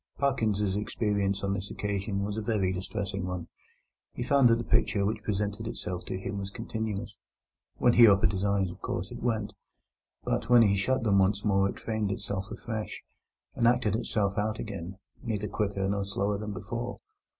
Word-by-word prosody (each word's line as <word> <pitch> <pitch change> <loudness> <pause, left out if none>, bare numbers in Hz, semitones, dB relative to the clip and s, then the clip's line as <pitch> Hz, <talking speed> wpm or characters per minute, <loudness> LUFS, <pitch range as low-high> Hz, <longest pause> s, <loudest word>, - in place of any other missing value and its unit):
Parkins's 110 -8 +1
experience 100 -2 0
on 100 0 +1
this 100 0 -4
occasion 100 -1 -2
was 100 0 -2
a 110 - -2
very 105 -4 +1
distressing 95 +1 -3
one. 90 -2 -4 0.6
He 120 - -3
found 135 -1 +5
that 115 - +6
the 120 - -3
picture 100 -4 +2
which 105 +1 -1
presented 105 +1 -2
itself 90 -5 -4
to - - -3
him 100 +1 -4
was 100 0 -4
continuous. 110 0 -4 0.6
When 120 - +4
he 120 -1 +9
opened 100 -2 +5
his 95 -1 -2
eyes, 100 -2 +1
of - - -13
course, - - -3
it - - -7
went; 110 -4 -1 0.7
but 115 - -1
when 120 -1 +8
he 100 -2 +4
shut 130 +6 +1
them 100 -3 +4
once 100 +2 +2
more 100 -1 +3
it - - -7
framed 110 -2 -1
itself 100 0 -3
afresh, 110 -2 -5 0.5
and 115 - +2
acted 120 -4 +3
itself 105 -3 0
out 110 +1 0
again, 95 0 -6 0.2
neither 105 -3 -2
quicker 100 -1 -1
nor 100 0 0
slower 100 +1 -1
than 105 0 -4
before. 115 +5 -5
100 Hz, 185 wpm, -29 LUFS, 100-110 Hz, 0.7 s, he